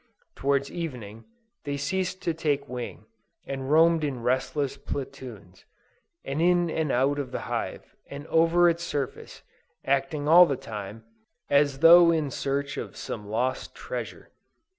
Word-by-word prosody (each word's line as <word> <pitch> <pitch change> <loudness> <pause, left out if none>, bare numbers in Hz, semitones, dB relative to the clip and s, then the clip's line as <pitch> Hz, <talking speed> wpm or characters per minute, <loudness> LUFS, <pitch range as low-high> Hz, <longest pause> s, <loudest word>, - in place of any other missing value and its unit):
Towards 140 0 0
evening, 120 -10 -7 0.4
they 145 -1 -3
ceased 185 +6 -2
to 170 - 0
take 145 -3 -1
wing, 125 -2 -7 0.4
and 135 -1 -5
roamed 165 +1 +4
in 130 -5 -3
restless 130 +3 -1
platoons, 120 -9 -8 0.6
in 170 +4 +1
and 155 -3 -1
out 135 +3 +1
of 135 -3 -4
the - - -4
hive, - - -5
and 140 +1 -8
over 165 +2 +4
its 170 0 +1
surface, 145 -6 -5 0.4
acting 140 +2 0
all 175 +3 +8
the 140 - -1
time, 105 0 -8 0.5
as 140 -1 +3
though 170 +1 +8
in 155 -4 0
search 140 +2 -2
of - - -6
some 105 -2 -6
lost 125 +5 -2
treasure. - - -7
140 Hz, 140 wpm, -26 LUFS, 130-165 Hz, 0.6 s, all